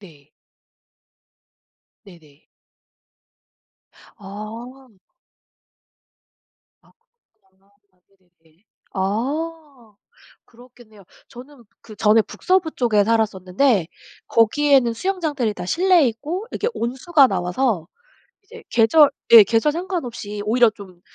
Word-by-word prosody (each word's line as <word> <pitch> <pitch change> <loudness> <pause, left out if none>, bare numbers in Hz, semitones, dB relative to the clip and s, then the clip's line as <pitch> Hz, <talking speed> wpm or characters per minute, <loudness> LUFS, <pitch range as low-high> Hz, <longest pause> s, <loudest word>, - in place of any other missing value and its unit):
네. 150 -7 -18 1.7
네네. 155 -6 -19 1.7
아. 225 +6 -10 1.9
아 - - -27 0.5
그렇구나. 190 0 -37 0.3
아 - - -39
네네네. 180 -2 -34 0.3
아 260 +4 -5 0.5
그렇겠네요. 235 -4 -19 0.2
저는 250 0 -15 0.2
그전에 215 0 +1
북서부 365 - -1
쪽에 215 -5 +1
살았었는데 210 -1 0 0.4
거기에는 255 +2 +2
수영장들이 300 - -2
다 175 - -7
실내에 345 - +3
있고 315 - -6
이렇게 460 - -2
온수가 265 +5 +2
나와서 180 0 -2 0.6
이제 - - -14
계절 280 +6 +4 0.2
예 225 -2 +11
계절 230 +8 +1
상관없이 250 - -5
오히려 235 +1 +3
좀 190 -5 -15
230 Hz, 205 characters per minute, -20 LUFS, 200-280 Hz, 1.9 s, 예